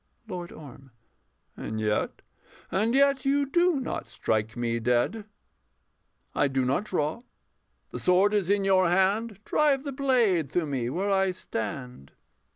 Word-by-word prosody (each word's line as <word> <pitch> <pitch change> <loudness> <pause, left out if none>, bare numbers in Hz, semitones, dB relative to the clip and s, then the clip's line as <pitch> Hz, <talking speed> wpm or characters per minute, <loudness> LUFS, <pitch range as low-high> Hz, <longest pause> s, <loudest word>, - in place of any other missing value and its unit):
LORD 180 -4 -6
ORM. 135 -2 -12 0.7
And 110 0 -5
yet 105 -1 -1 0.5
and 215 +7 +1
yet 275 -1 +3
you 280 +1 +2
do 345 +1 +2
not 260 - -4
strike 110 +1 -2
me 115 -1 -1
dead. 125 - 0 1.1
I 145 - +2
do 135 -1 0
not 135 +11 0
draw: 160 +2 -2 0.7
the - - -5
sword 190 +3 +3
is 200 -4 +1
in 200 -1 +2
your 185 -2 +4
hand 195 +4 +1
Drive 285 -3 +2
the 285 - -4
blade 235 - +2
through 175 -2 0
me 130 -5 -2
where 195 +9 -1
I 195 -1 +3
stand. 125 - -6
185 Hz, 145 wpm, -27 LUFS, -, 1.1 s, your